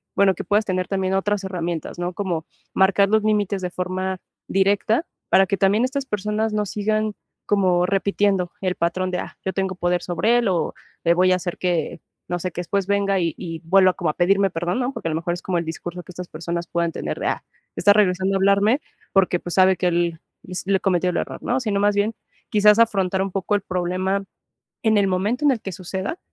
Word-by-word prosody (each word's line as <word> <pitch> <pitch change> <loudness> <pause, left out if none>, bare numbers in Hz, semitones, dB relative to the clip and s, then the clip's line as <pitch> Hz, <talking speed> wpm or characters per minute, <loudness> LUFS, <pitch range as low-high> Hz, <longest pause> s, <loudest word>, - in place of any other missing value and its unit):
bueno, 195 -1 +4
que - - -5
puedas 210 +1 +1
tener 185 -2 -1
también 190 -1 -1
otras 200 +1 0
herramientas, 175 -3 -4
¿no? 175 +1 -2
Como 175 -4 -3 0.3
marcar 195 +1 +4
los 215 0 +3
límites 205 -2 +1
de 180 - -2
forma 185 +1 -3 0.3
directa, 200 - +2 0.2
para 190 - +5
que 200 - 0
también 200 +4 +3
estas 270 +1 -3
personas 210 +1 -1
no 210 0 0
sigan 215 +1 -1 0.3
como 185 -3 +2
repitiendo 195 -1 +1
el 185 -2 0
patrón 185 +2 -1
de, 180 - -1
ah, - - -7
yo 190 - -1
tengo 190 -1 -1
poder 175 0 0
sobre 215 +7 +2
él 235 - 0
o 180 -3 0 0.3
le 170 - +4
voy 185 +1 +4
a - - +4
hacer 175 -1 -5
que, 175 -2 -1 0.3
no 175 - -2
sé, 180 +1 -3
que 175 - -4
después 195 +2 -1
venga 200 -1 +1
y 165 -3 -1
y 165 -3 -6
vuelva 185 +1 +5
como 175 -4 -2
a - - -16
pedirme 195 +2 +3
perdón, 175 +5 -2
¿no? 250 +1 0
Porque, 165 - -5
a - - -2
lo - - -1
mejor, 170 +2 -1
es 175 - -9
como 180 -2 0
el 170 - -4
discurso 175 +2 -6
que 175 - -12
estas 180 0 -7
personas 170 +2 -4
puedan 170 -1 -1
tener - - -4
de, - - -1
ah, - - -1 0.3
está 205 +2 +5
regresando 190 -2 +2
a - - +3
hablarme 200 +7 +3 0.3
porque, 185 -2 +3
pues, 175 - -6
sabe 185 -1 +5
que 180 - +1
él 170 -1 0 0.2
hiz 180 +1 -6
l 195 -1 +3
cometió 180 -1 +1
el 175 - -2
error, - - -4
¿no? 245 - 0
Si 230 -5 -2
no, 200 - +1
más 205 0 +2
bien, 210 +2 +1 0.3
quizás 210 +1 +5
afrontar 195 -4 +2
un 195 0 -2
poco 195 +2 0
el 205 - 0
problema 185 +2 -1 0.6
en 220 -2 +3
el 200 -1 +3
momento 205 +9 0
en 290 - +6
el 240 -5 -2
que 195 - -5
suceda, 190 - -4
190 Hz, 225 wpm, -22 LUFS, 180-205 Hz, 0.6 s, en